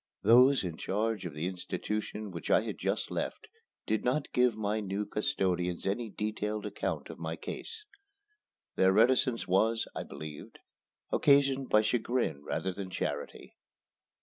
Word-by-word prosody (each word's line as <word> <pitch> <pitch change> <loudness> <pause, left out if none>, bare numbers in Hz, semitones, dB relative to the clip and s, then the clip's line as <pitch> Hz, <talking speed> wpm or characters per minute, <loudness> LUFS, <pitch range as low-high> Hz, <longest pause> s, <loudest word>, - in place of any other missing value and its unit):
Those 125 +5 +6
in 85 -3 -4
charge 105 -1 -1
of 80 - -9
the 75 +3 -3
institution 105 +3 -4
which 85 -2 -6
I - - +5
had - - -5
just - - -1
left - - -3 0.4
did 110 0 0
not 130 +5 0
give 125 -3 +3
my 105 0 0
new 100 0 -2
custodians 90 -8 -1
any 110 +4 -1
detailed 105 0 -3
account 105 - -3
of - - -11
my 80 0 -3
case. 445 - -7 0.9
Their 95 0 +4
reticence 125 +2 +3
was, 110 +5 +2
I - - -2
believe, 75 +1 -8 0.6
occasioned 140 -2 +4
by 105 - +5
chagrin 115 - 0
rather 95 +5 -2
than 95 0 -6
charity. 90 - -4
105 Hz, 145 wpm, -31 LUFS, 95-120 Hz, 0.9 s, Those